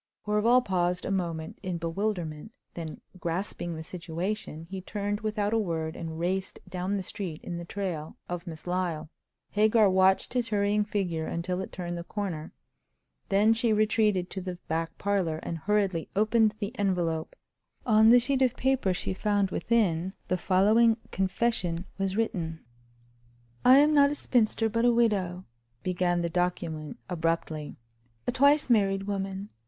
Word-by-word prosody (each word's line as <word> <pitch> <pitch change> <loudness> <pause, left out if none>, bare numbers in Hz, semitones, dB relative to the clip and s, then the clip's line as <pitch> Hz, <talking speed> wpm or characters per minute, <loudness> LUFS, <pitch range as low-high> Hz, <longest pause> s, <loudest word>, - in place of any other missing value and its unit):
Horval 225 +4 +3
paused 180 -2 0
a - - -2
moment 170 -4 -3
in 185 -3 -3
bewilderment; 170 0 -3 0.2
then, 160 -3 -7 0.2
grasping 175 0 -3
the 160 - -6
situation, 170 0 -4
he 190 -1 -4
turned, 205 +2 -3
without 215 -1 -1
a 225 - +3
word, 160 -5 -2
and 160 -2 -6
raced 185 +3 -2
down 185 +2 -2
the 190 - -3
street 180 -4 -5
in 175 - -5
the 170 - -7
trail 170 -5 -4
of 175 +1 -5
Miss 160 -2 -8
Lyle. 175 -4 -2 0.4
Hagar 215 +1 +4
watched 190 +3 +3
his 245 -2 +1
hurrying 205 0 +2
figure 180 -6 -2
until 180 +2 -2
it - - -6
turned 175 -1 -4
the - - -5
corner; 175 -5 -4 0.8
then 210 +2 +4
she 225 0 +1
retreated 210 -3 +2
to 190 - -4
the 180 -1 -5
back 165 +1 -2
parlor, 190 -6 0
and 165 - -4
hurriedly 195 -2 0
opened 215 +1 +3
the 210 +1 -4
envelope. 175 -5 0 0.5
On 220 -1 +6
the 245 +1 +8
sheet 265 +2 +1
of 255 -2 +2
paper 260 -8 +1
she 190 - -2
found 200 0 +1
within 190 -6 +1 0.2
the 185 - +2
following 215 +6 +4
confession 190 -3 0
was 195 0 -1
written: 165 - -2 1.0
"I 255 +2 +8
am 295 +2 +5
not 285 -1 +6
a 295 - -2
spinster, 225 -4 +2
but 230 +2 0
a 245 - +5
widow," 195 -6 +1 0.4
began 175 -1 0
the - - +1
document 170 -3 -2
abruptly—"a 125 -9 -4
twice 285 +2 +4
married 195 -5 +3
woman. 195 0 -3
190 Hz, 155 wpm, -28 LUFS, 170-215 Hz, 1.0 s, the